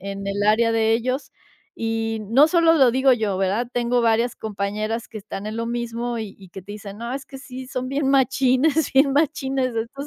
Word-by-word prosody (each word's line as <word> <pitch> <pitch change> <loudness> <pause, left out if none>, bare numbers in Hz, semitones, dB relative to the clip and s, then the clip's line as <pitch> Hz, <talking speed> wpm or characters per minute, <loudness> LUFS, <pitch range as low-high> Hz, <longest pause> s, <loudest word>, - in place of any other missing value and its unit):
en 195 +1 -6
el 200 +1 -2
área 230 +2 +3
de 225 0 +2
ellos 255 +4 -1 0.5
y 225 0 -1
no 270 +7 +6
solo 330 -1 +4
lo 265 -5 +5
digo 260 +2 +4
yo, 215 -5 0
¿verdad? 200 +6 0
Tengo 245 0 +1
varias 230 +1 +2
compañeras 215 +2 -3
que 225 - -10
están 205 0 -7
en 215 - -5
lo 230 0 -2
mismo 235 0 -3
y 215 -3 -6
y 190 -2 -14
que 190 0 -9
te 205 +2 -9
dicen: 205 0 -9
"No, 235 +2 -5
es 270 -1 -5
que 270 - -10
sí 260 -1 -9
son 255 -1 -4
bien 275 +1 -1
machines 270 +3 +2
bien 275 0 +5
machines 270 -4 0
estos 235 +5 -4
235 Hz, 210 wpm, -22 LUFS, 215-265 Hz, 0.5 s, no